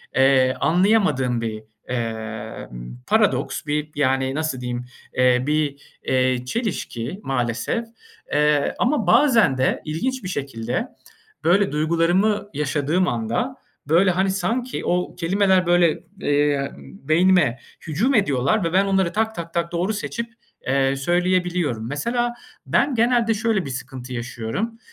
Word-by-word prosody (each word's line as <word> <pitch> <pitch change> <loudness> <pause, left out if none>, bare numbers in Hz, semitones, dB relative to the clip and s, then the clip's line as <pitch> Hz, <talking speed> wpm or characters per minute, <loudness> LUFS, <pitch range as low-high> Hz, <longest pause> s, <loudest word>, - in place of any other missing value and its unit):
eee, 130 -1 +4
anlayamadığım 160 - +2
bir, 110 -1 -4 0.3
emm, 110 - -5
paradoks. - - +1
Bir, 150 +1 -2
yani, 130 -1 +1
nasıl 155 -4 -2
diyeyim? 125 0 -4 0.3
Eee, 125 0 +4
bir, 150 -2 0 0.2
eee, 130 -1 +1
çelişki 175 - -3
maalesef. 125 - -1 0.5
Eee, 150 -1 +2
ama 250 -5 +1
bazen 225 - +5
de 130 - +1
ilginç 250 +12 -2
bir 180 - -4
şekilde 135 - -3 0.6
böyle 195 +4 +3
duygularımı 170 +7 +1
yaşadığım 150 +5 0
anda, 120 - -1 0.3
böyle, 175 +5 +4
hani, 190 +2 +1
sanki 240 +6 -2
o 180 0 -1
kelimeler 190 +1 +2
böyle, 175 -2 +3 0.2
eee, 145 -1 +1
beynime 175 -4 +2 0.3
hücum 215 - +1
ediyorlar 185 - +2
ve 165 0 -1
ben, 195 +2 +4
onları 190 -3 +1
tak 220 +1 0
tak 170 -1 -7
tak 170 0 -1
doğru 175 +5 -1
seçip, 230 +2 -4 0.3
eee, 135 +1 +2
söyleyebiliyorum. 175 -5 0
Mesela, 240 - -1 0.3
ben, 275 -2 +2
genelde 235 0 +3
şöyle 220 -3 0
bir 135 - -5
sıkıntı 130 0 -7
yaşıyorum; 120 - -4
155 Hz, 125 wpm, -22 LUFS, 130-195 Hz, 0.6 s, bazen